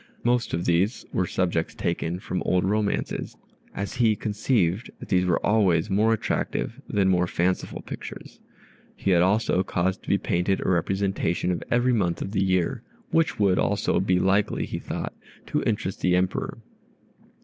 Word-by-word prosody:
Most 120 Hz, 0 st, +1 dB
of 85 Hz, -, -3 dB
these 90 Hz, +7 st, +1 dB
were 90 Hz, -, +1 dB
subjects 85 Hz, -3 st, -1 dB
taken 85 Hz, +2 st, -2 dB
from 90 Hz, -1 st, -3 dB
old 90 Hz, 0 st, +1 dB
romances, 105 Hz, +2 st, -1 dB, 0.4 s
as 100 Hz, +5 st, -4 dB
he 115 Hz, -3 st, +4 dB
conceived 105 Hz, -2 st, 0 dB
that -, -, -10 dB
these 90 Hz, -2 st, +2 dB
were 90 Hz, -, +2 dB
always 100 Hz, -3 st, +3 dB
more 105 Hz, +3 st, +3 dB
attractive 110 Hz, -, -2 dB
than 95 Hz, -2 st, +2 dB
mere 90 Hz, -1 st, +2 dB
fanciful 90 Hz, +2 st, -1 dB
pictures. -, -, -9 dB, 0.6 s
He 100 Hz, -, 0 dB
had 85 Hz, -2 st, +5 dB
also 95 Hz, 0 st, +2 dB
caused 95 Hz, 0 st, -1 dB
to -, -, -10 dB
be 100 Hz, -, +4 dB
painted 90 Hz, +1 st, 0 dB
a -, -, -3 dB
representation 95 Hz, -1 st, 0 dB
of 90 Hz, -, -2 dB
every 125 Hz, +1 st, +3 dB
month 90 Hz, -7 st, +1 dB
of 95 Hz, -, -4 dB
the 100 Hz, -2 st, +1 dB
year, 95 Hz, +6 st, +1 dB, 0.3 s
which 165 Hz, 0 st, +2 dB
would 100 Hz, -3 st, +3 dB
also 100 Hz, 0 st, +1 dB
be 95 Hz, -1 st, +2 dB
likely, 95 Hz, +3 st, +1 dB
he -, -, -5 dB
thought, -, -, -5 dB, 0.3 s
to -, -, -1 dB
interest 105 Hz, -3 st, -2 dB
the 90 Hz, -1 st, +3 dB
Emperor. 90 Hz, 0 st, -1 dB
95 Hz, 165 wpm, -25 LUFS, 90-105 Hz, 0.6 s, had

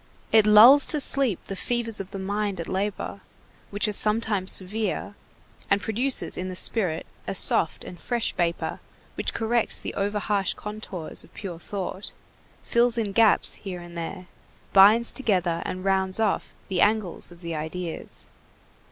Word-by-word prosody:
It 220 Hz, -1 st, +5 dB
lulls 235 Hz, +7 st, +8 dB
to 300 Hz, -, 0 dB
sleep 270 Hz, -, +2 dB
the 195 Hz, -, -6 dB
fevers 230 Hz, +1 st, -1 dB
of 195 Hz, -1 st, -6 dB
the -, -, -7 dB
mind 200 Hz, 0 st, -3 dB
at 170 Hz, -, -5 dB
labor, 195 Hz, +2 st, -4 dB, 0.5 s
which 205 Hz, +2 st, 0 dB
are -, -, -1 dB
sometimes 210 Hz, -2 st, +1 dB
severe, 205 Hz, +1 st, +1 dB, 0.6 s
and 200 Hz, -, +3 dB
produces 240 Hz, +6 st, +1 dB
in 185 Hz, +1 st, -4 dB
the 185 Hz, -, -6 dB
spirit 180 Hz, -4 st, -1 dB, 0.2 s
a -, -, -3 dB
soft 165 Hz, -, +3 dB
and 175 Hz, -, -10 dB
fresh 240 Hz, -2 st, -2 dB
vapor 170 Hz, -1 st, -2 dB, 0.3 s
which -, -, -2 dB
corrects 230 Hz, +1 st, 0 dB
the -, -, -6 dB
over 205 Hz, +1 st, -2 dB
harsh 200 Hz, -2 st, -1 dB
contours 210 Hz, -5 st, -6 dB
of -, -, -21 dB
pure 175 Hz, -5 st, -7 dB
thought, 195 Hz, +1 st, -6 dB, 0.5 s
fills 235 Hz, 0 st, +2 dB
in 215 Hz, -3 st, -1 dB
gaps 220 Hz, +1 st, +4 dB
here 185 Hz, -3 st, -6 dB
and 175 Hz, 0 st, -12 dB
there, 180 Hz, +2 st, -6 dB, 0.5 s
binds 210 Hz, +4 st, +6 dB
together 180 Hz, -9 st, 0 dB
and 185 Hz, +1 st, -6 dB
rounds 190 Hz, 0 st, +1 dB
off 215 Hz, -3 st, -1 dB
the 185 Hz, -3 st, -1 dB
angles 210 Hz, -5 st, 0 dB
of 175 Hz, 0 st, -15 dB
the 170 Hz, -1 st, -5 dB
ideas. 160 Hz, +2 st, -6 dB
200 Hz, 160 wpm, -25 LUFS, 185-220 Hz, 0.6 s, lulls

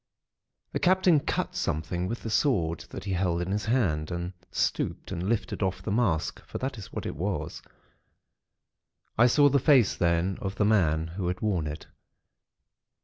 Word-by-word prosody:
The -, -, -2 dB
Captain 185 Hz, -3 st, +4 dB
cut -, -, -2 dB
something 85 Hz, +4 st, -2 dB
with 115 Hz, +4 st, -5 dB
the 115 Hz, -, -4 dB
sword 90 Hz, -, +1 dB
that -, -, -7 dB
he 100 Hz, -1 st, -2 dB
held 90 Hz, -2 st, 0 dB
in 90 Hz, +2 st, -2 dB
his 105 Hz, +1 st, -1 dB
hand, 95 Hz, -11 st, +1 dB
and 90 Hz, +1 st, -4 dB, 0.2 s
stooped -, -, -2 dB
and 90 Hz, +4 st, -2 dB
lifted 115 Hz, -2 st, -1 dB
off 95 Hz, -1 st, -1 dB
the 105 Hz, -, -3 dB
mask; 100 Hz, -8 st, 0 dB
for -, -, -7 dB
that 130 Hz, -3 st, -4 dB
is 100 Hz, -, -10 dB
what -, -, -5 dB
it -, -, -4 dB
was. 95 Hz, +6 st, -3 dB, 1.5 s
I 120 Hz, +2 st, +6 dB
saw 145 Hz, +4 st, +5 dB
the 140 Hz, 0 st, +3 dB
face 130 Hz, -, +4 dB
then 85 Hz, +2 st, +1 dB
of 95 Hz, 0 st, -3 dB
the 105 Hz, -, +1 dB
man 80 Hz, -7 st, +3 dB
who 90 Hz, +1 st, -4 dB
had 90 Hz, 0 st, -2 dB
worn 95 Hz, -8 st, 0 dB
it. 75 Hz, +1 st, -6 dB
95 Hz, 175 wpm, -28 LUFS, 85-115 Hz, 1.5 s, I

